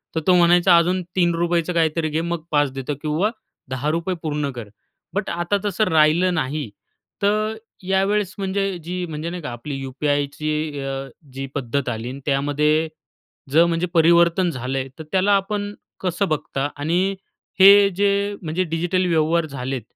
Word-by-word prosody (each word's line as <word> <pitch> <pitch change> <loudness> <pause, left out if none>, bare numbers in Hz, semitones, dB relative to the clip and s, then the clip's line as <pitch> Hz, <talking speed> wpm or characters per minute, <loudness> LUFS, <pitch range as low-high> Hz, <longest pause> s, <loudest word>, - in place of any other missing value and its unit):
तर - - +2
तो 180 - +6
म्हणायचा 175 0 +5
अजून 180 +2 +2
₹3याच 175 -1 +2
काहीतरी 160 -1 +1
घे 160 +2 -1
मग 170 -1 -3
5 145 -3 +1
देतो 145 +3 -3
किंवा 160 +7 0 0.4
₹10 155 +8 -1
पूर्ण 150 -2 -1
कर. 120 -5 -8 0.4
बट 200 +1 -2
आता 175 +4 0
तसं 205 +1 +1
राहिलं 160 +3 +4
नाही, 150 -5 -2 0.5
तर 215 +2 +1 0.3
यावेळेस 195 +1 +1
म्हणजे 195 -1 -1
जी 180 +2 -3
म्हणजे 160 0 -5
नाही 175 0 -6
का 150 - -5
आपली 120 +5 -6
यू-पी-आयची 145 +2 -2
अ, 135 0 -4 0.3
जी 135 +1 -4
पद्धत 135 0 -2
आली 115 +1 -4
आणि 135 - -7
त्यामध्ये, 150 +3 +1 0.6
जर 165 +4 +6
म्हणजे 170 +1 0
परिवर्तन 170 +2 +4
झालंय 130 0 -3
तर - - -5
त्याला 195 +2 +3
आपण 205 +1 -2 0.3
कसं 185 +2 -1
बघता? 145 -2 -2
आणि 175 +7 0 0.4
हे 200 +1 +8
जे 200 +1 +1
म्हणजे 165 +2 -1
डिजिटल 175 +2 0
व्यवहार 165 0 +2
झालेत, 135 -3 -4
165 Hz, 150 wpm, -22 LUFS, 145-185 Hz, 0.6 s, हे